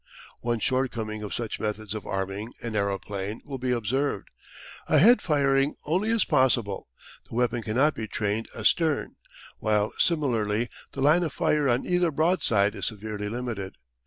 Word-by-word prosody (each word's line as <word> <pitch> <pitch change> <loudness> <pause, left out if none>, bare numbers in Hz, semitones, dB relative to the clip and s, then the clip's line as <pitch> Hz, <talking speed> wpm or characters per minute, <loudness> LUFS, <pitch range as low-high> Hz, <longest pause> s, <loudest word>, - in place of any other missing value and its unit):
One 120 0 -1
shortcoming 115 -3 -1
of 105 - -6
such 115 -3 -3
methods 105 -1 -3
of 110 - -6
arming 95 +4 -3
an 115 -2 -4
aeroplane 100 +1 -2
will 135 -2 -6
be 130 +1 -2
observed. 125 0 -1 0.6
Ahead 240 +7 +6
firing 140 -2 +2
only 185 +8 +1
is 225 -4 +2
possible; 120 -6 +2 0.4
the - - -8
weapon 120 -1 +1
cannot 130 +8 +2
be 110 - -5
trained 105 +1 -2
astern, 150 +7 +1 0.4
while 105 -1 +1
similarly 120 -8 +1 0.2
the 135 - -4
line 150 +5 +5
of 160 -5 -2
fire 150 -3 +2
on 120 +1 +1
either 180 -1 +2
broadside 140 - +2
is - - -3
severely 105 -1 -4
limited. 110 -5 -4
120 Hz, 150 wpm, -26 LUFS, 105-140 Hz, 0.6 s, Ahead